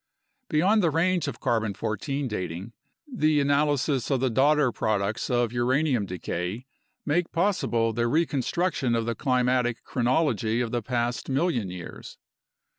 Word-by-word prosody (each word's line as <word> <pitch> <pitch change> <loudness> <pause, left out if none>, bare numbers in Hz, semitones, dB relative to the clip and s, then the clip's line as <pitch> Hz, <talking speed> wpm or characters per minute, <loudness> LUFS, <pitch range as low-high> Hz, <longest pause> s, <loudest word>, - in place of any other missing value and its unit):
Beyond 185 +7 +3
the 170 - +3
range 170 +1 +1
of 130 -4 -4
14 110 -4 0 0.5
C - - -1
dating, 95 0 -5 0.3
the 155 - +2
analysis 140 -2 +1
of 135 -3 +1
the 130 -1 +1
daughter 140 +2 +3
products 105 -1 -1
of 120 -2 +1
uranium 125 -2 +1
decay 90 +5 -4 0.4
make 165 +3 0
possible 165 - +1
the 120 +1 0
reconstruction 150 -1 0
of 115 -1 0
the 115 - -1
climatic 125 0 +1
chronology 120 - +1
of 120 -2 -1
the 120 - -1
past 120 +2 -2
million 135 - 0
years. 90 -1 -9
125 Hz, 135 wpm, -26 LUFS, 115-150 Hz, 0.5 s, Beyond